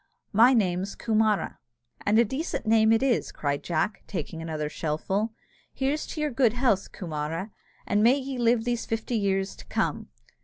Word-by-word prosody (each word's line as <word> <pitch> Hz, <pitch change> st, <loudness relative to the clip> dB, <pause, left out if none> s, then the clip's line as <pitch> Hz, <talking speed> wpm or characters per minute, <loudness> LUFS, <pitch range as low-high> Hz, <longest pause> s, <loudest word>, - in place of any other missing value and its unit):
My 240 Hz, +5 st, +6 dB
name's 190 Hz, -2 st, 0 dB
Coomara." 215 Hz, -5 st, +1 dB, 0.5 s
"And 210 Hz, +2 st, +4 dB
a -, -, +7 dB
mighty 240 Hz, +3 st, -1 dB
decent 320 Hz, -5 st, -3 dB
name 220 Hz, 0 st, +4 dB
it 225 Hz, +3 st, +3 dB
is," 255 Hz, -4 st, +1 dB
cried 145 Hz, -1 st, -2 dB
Jack, 175 Hz, +5 st, -1 dB
taking 165 Hz, -3 st, -5 dB
another 155 Hz, -2 st, -3 dB
shellfull: 165 Hz, +8 st, -1 dB, 0.5 s
"here's 280 Hz, +3 st, -1 dB
to 310 Hz, -, -5 dB
your 300 Hz, -1 st, 0 dB
good 240 Hz, -3 st, +3 dB
health, 240 Hz, -6 st, +1 dB
Coomara, 165 Hz, +3 st, -4 dB, 0.3 s
and 205 Hz, -, +2 dB
may 240 Hz, +5 st, +5 dB
ye 265 Hz, -2 st, -4 dB
live 235 Hz, -1 st, +3 dB
these 240 Hz, -1 st, -2 dB
fifty 225 Hz, +2 st, -3 dB
years 195 Hz, -2 st, 0 dB
to -, -, -12 dB
come!" -, -, -1 dB
215 Hz, 175 wpm, -27 LUFS, 180-240 Hz, 0.5 s, a